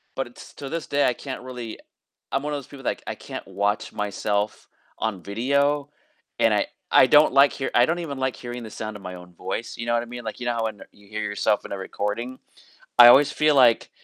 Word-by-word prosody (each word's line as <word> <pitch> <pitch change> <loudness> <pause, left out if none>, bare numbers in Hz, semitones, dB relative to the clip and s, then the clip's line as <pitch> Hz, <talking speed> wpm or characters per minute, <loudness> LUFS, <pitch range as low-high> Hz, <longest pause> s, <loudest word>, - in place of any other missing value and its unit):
but 125 -2 -4 0.2
to 140 - -6
this 165 +1 -4
day, 145 0 +2
I 125 - +2
can't 130 +1 -7
really 125 -3 -7 0.5
I'm 135 - 0
one 150 0 -3
of 145 - -1
those 140 - -10
people 140 -2 -12
that, - - +2
like, - - -6
I - - -3
can't - - -8
watch 105 +1 -1
myself 105 0 -2 0.3
on 105 -5 -2
video, 140 - +1 0.5
and - - +4
I - - +2 0.2
I - - +7
don't 145 +3 +6
like 140 +1 +6
hear 135 - -3
I 120 +1 +6
don't 170 - 0
even 145 -5 -5
like 130 -1 -1
hearing 120 0 -7
the 110 - -7
sound 110 0 -6
of 100 - -12
my 90 -1 -7
own 90 0 -12
voice, 115 +6 -5
you 115 - -4
know 120 - +1
what 120 - +1
I - - -8
mean? 120 0 -8
Like, 110 - -5
you 125 - -4
know 120 - +1
how 115 -1 -1
when 110 -2 -4
you 100 -1 -21
hear 105 0 -4
yourself 105 +1 0
in - - -8
a 100 - -3
recording? 105 +6 -4 0.6
I 120 - +12
always 135 +4 +7
feel 155 0 +3
like, 120 -4 +5
120 Hz, 245 wpm, -24 LUFS, 105-135 Hz, 0.6 s, I